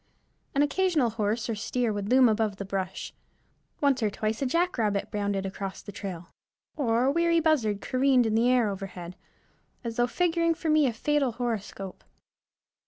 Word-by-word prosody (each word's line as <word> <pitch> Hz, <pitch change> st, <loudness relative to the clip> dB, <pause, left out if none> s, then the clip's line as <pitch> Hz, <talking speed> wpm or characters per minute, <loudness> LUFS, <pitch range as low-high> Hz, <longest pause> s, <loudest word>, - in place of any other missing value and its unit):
An 280 Hz, -, +4 dB
occasional 310 Hz, -6 st, +2 dB
horse 215 Hz, +1 st, -1 dB
or 230 Hz, -, -1 dB
steer 225 Hz, +2 st, -1 dB
would 205 Hz, 0 st, -3 dB
loom 255 Hz, 0 st, +6 dB
above 215 Hz, -2 st, +1 dB
the 200 Hz, -, -6 dB
brush; 190 Hz, -1 st, -4 dB, 0.7 s
once 275 Hz, -3 st, +3 dB
or 215 Hz, -, +2 dB
twice 215 Hz, +3 st, -3 dB
a 270 Hz, -, +1 dB
jackrabbit 250 Hz, -, 0 dB
bounded 200 Hz, -2 st, -1 dB
across 195 Hz, 0 st, -5 dB
the 205 Hz, -, -8 dB
trail, 180 Hz, -4 st, -6 dB, 0.5 s
or 235 Hz, -4 st, +1 dB
a 265 Hz, -, +3 dB
weary 335 Hz, +2 st, +3 dB
buzzard 250 Hz, -11 st, +1 dB
careened 255 Hz, -1 st, +3 dB
in 220 Hz, -, 0 dB
the 230 Hz, +2 st, +3 dB
air 250 Hz, -3 st, +3 dB
overhead, 190 Hz, -3 st, -6 dB, 0.7 s
as 230 Hz, -1 st, -5 dB
though 240 Hz, 0 st, +3 dB
figuring 335 Hz, +3 st, +1 dB
for 320 Hz, -1 st, -1 dB
me 305 Hz, -2 st, +4 dB
a -, -, +1 dB
fatal 280 Hz, +1 st, 0 dB
horoscope. 215 Hz, -5 st, -4 dB
230 Hz, 170 wpm, -27 LUFS, 205-275 Hz, 0.7 s, loom